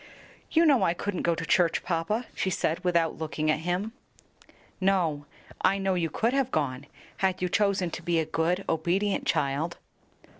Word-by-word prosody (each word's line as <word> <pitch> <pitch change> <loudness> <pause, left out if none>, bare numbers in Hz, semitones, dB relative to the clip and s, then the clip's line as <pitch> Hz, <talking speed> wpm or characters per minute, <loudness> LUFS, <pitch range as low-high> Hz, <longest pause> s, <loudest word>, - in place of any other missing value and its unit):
"You 330 +1 +4
know 280 -6 +5
I 170 - +2
couldn't 205 0 -3
go 170 -1 +1
to 165 - -4
church, 170 -2 +2
papa," 185 +7 -1
she 190 - -1
said, 170 0 -1
without 170 -3 +1
looking 155 -1 -1
at 155 - 0
him. 180 +6 -2 0.9
"No; 175 -7 +1 0.3
I 195 - +3
know 195 -1 0
you 170 -3 0
could 230 - 0
have 270 -2 +1
gone, 140 - -2 0.3
had 190 -1 +1
you 180 - 0
chosen 195 -2 +1
to - - -6
be 170 0 0
a 160 - +1
good, 175 +5 0
obedient 180 +6 0
child." 150 +5 0
175 Hz, 175 wpm, -27 LUFS, 160-195 Hz, 0.9 s, know